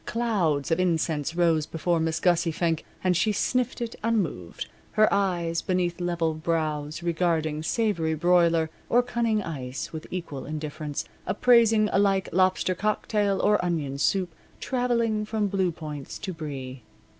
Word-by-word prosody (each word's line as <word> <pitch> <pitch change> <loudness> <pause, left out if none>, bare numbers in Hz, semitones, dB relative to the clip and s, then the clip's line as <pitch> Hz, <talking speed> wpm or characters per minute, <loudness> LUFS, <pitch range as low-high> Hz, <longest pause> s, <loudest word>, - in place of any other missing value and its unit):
Clouds 185 -12 0
of 165 - +2
incense 165 -3 0
rose 165 -3 +2
before 165 +1 0
Miss 160 0 0
Gussie 175 -1 +2
Fink 165 0 0 0.2
and 185 -1 +3
she 195 +6 +2
sniffed 250 +4 0
it 235 -1 -3
unmoved, 180 - -1 0.3
her 215 0 +5
eyes, 175 -4 0
beneath 180 -1 -1
level 170 -2 0
brows, 155 -1 -2
regarding 160 -3 0
savory 170 -4 0
broiler 170 -1 +3 0.2
or 245 +1 +4
cunning 230 -3 0
ice 135 -5 -5
with 160 0 -6
equal 165 -7 -5
indifference, 150 -1 -4 0.2
appraising 225 -2 +4
alike 195 -1 +2
lobster 185 0 +2
cocktail 205 0 0
or 210 -2 +3
onion 150 -6 -2
soup, 180 +2 +1 0.3
traveling 235 -4 0
from 215 0 -1
blue 190 -2 +1
points 150 -4 -7
to 190 - -5
brie. 135 -5 -6
175 Hz, 140 wpm, -26 LUFS, 155-205 Hz, 0.3 s, her